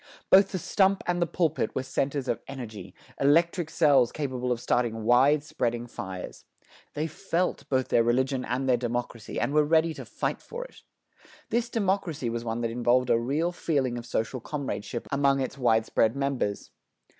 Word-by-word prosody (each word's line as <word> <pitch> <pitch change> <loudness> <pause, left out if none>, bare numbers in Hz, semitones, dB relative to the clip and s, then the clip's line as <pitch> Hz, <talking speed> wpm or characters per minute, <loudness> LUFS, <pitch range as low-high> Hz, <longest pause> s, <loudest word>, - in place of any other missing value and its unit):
Both 195 +1 +7
the 190 - -2
stump 195 +2 +2
and 175 0 0
the 170 - +2
pulpit 160 -2 0
were 130 - -1
centers 135 +1 -2
of 120 -2 -1
energy, 115 -8 -8 0.2
electric 165 +4 +3
cells 145 -8 +4
capable 130 -4 -3
of 120 - 0
starting 120 -2 0
widespreading 125 -2 +2
fires. 95 -5 -7 0.5
They 150 - -1
felt 170 +3 -2
both 130 -1 +1
their 115 - +4
religion 130 +3 +1
and 130 +2 -2
their 125 -2 +4
democracy, 120 -1 -4
and 140 - -1
were 150 0 +5
ready 160 +2 +3
to - - -8
fight - - -3
for - - -7
it. - - -15 0.7
This 235 +1 0
democracy 190 - -1
was 120 0 -3
one 115 0 -3
that 115 -1 -1
involved 125 +1 +2
a 115 - +4
real 145 +9 0
feeling 140 -8 -1
of 120 0 -7
social 125 +2 -2
comradeship 120 -5 -5
among 140 0 +3
its 135 +1 -3
widespread 115 -1 +2
members. 135 -7 -2
130 Hz, 170 wpm, -27 LUFS, 120-155 Hz, 0.7 s, Both